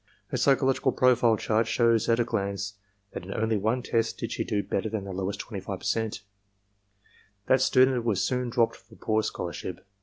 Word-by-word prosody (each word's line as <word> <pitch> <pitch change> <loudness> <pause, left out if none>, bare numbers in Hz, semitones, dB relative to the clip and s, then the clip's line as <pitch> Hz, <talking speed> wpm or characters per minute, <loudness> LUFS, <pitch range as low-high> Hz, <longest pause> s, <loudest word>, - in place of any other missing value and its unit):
Her - - -2
psychological 135 -1 +2
profile 120 -3 +4
chart 110 +1 +1
shows 115 -1 +2
at 115 +1 +3
a - - +4
glance 100 -2 -3 0.4
that - - -5
in 95 - -8
only 110 0 +1
one 110 +5 0
test 115 -2 0
did - - -4
she - - -2
do 100 -1 -1
better 105 +3 -2
than 110 -2 -3
the 95 -1 -6
lowest 95 +2 -3
25%. 105 +1 -3 1.2
That 130 0 +3
student 130 -1 +4
was 105 -5 +1
soon 125 -1 -1
dropped 115 -1 +1
for - - -19
poor 110 0 0
scholarship. 85 -2 -5
110 Hz, 175 wpm, -27 LUFS, 100-120 Hz, 1.2 s, profile